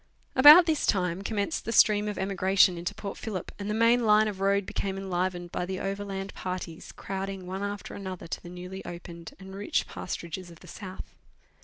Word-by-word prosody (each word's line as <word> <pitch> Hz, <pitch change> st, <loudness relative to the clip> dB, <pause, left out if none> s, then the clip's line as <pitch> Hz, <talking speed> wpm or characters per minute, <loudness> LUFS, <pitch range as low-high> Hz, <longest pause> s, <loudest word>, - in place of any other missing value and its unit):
About 295 Hz, +6 st, +10 dB
this 315 Hz, -3 st, 0 dB
time 180 Hz, -2 st, +1 dB
commenced 205 Hz, +7 st, -2 dB
the 230 Hz, -, -3 dB
stream 210 Hz, -2 st, +5 dB
of 210 Hz, -2 st, -3 dB
emigration 190 Hz, -1 st, +3 dB
into' 175 Hz, +1 st, -4 dB
Port 200 Hz, -1 st, -6 dB
Phillip, 200 Hz, -6 st, -5 dB
and 200 Hz, 0 st, -4 dB
the 210 Hz, -, 0 dB
main 230 Hz, +2 st, +4 dB
line 215 Hz, 0 st, +5 dB
of 200 Hz, -3 st, -4 dB
road 200 Hz, 0 st, +2 dB
became 195 Hz, 0 st, -3 dB
enlivened 180 Hz, -2 st, -2 dB
by -, -, -2 dB
the 185 Hz, +1 st, -4 dB
overland 195 Hz, 0 st, -4 dB
parties 180 Hz, -3 st, -6 dB
crowding 195 Hz, -1 st, -5 dB
one 190 Hz, +2 st, -5 dB
after 205 Hz, 0 st, -5 dB
another 190 Hz, -2 st, -6 dB
to 165 Hz, -, -5 dB
the 175 Hz, -, -10 dB
newly 180 Hz, +2 st, -8 dB
opened 170 Hz, -1 st, -9 dB
and 190 Hz, 0 st, -10 dB
rich 200 Hz, +1 st, -1 dB
pasturages 175 Hz, 0 st, -6 dB
of 170 Hz, -, -15 dB
the -, -, -14 dB
south. 185 Hz, -1 st, -9 dB
195 Hz, 190 wpm, -28 LUFS, 180-205 Hz, -, About